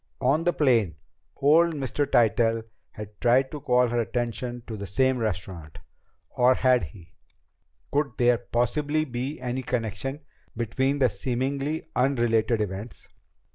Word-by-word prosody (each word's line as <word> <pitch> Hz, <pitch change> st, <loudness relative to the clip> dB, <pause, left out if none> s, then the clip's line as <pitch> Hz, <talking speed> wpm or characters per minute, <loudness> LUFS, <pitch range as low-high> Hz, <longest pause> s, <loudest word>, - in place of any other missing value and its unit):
On 140 Hz, +6 st, +2 dB
the 175 Hz, -, +4 dB
plane, 115 Hz, -, +2 dB, 0.4 s
old 160 Hz, +4 st, +4 dB
Mr. 140 Hz, +1 st, -1 dB
Tytell 115 Hz, -1 st, +2 dB, 0.3 s
had 105 Hz, -1 st, -10 dB
tried 125 Hz, +2 st, +3 dB
to 150 Hz, -, -6 dB
call 125 Hz, -3 st, +2 dB
her 120 Hz, 0 st, 0 dB
attention 120 Hz, +1 st, -3 dB
to 115 Hz, -, -6 dB
the 100 Hz, -1 st, -6 dB
same 130 Hz, +6 st, +1 dB
restaurant 90 Hz, -7 st, -4 dB, 0.5 s
or 125 Hz, +1 st, +4 dB
had 125 Hz, -7 st, +3 dB
he? 85 Hz, +2 st, -15 dB, 0.8 s
Could 145 Hz, 0 st, 0 dB
there 120 Hz, -2 st, +3 dB
possibly 145 Hz, +6 st, 0 dB
be 130 Hz, +3 st, -4 dB
any 125 Hz, +1 st, -3 dB
connection 125 Hz, -, -3 dB, 0.4 s
between 130 Hz, +5 st, 0 dB
the 135 Hz, -2 st, +4 dB
seemingly 135 Hz, +7 st, -2 dB
unrelated 120 Hz, -4 st, +2 dB
events? 105 Hz, +3 st, -6 dB
125 Hz, 135 wpm, -26 LUFS, 115-135 Hz, 0.8 s, the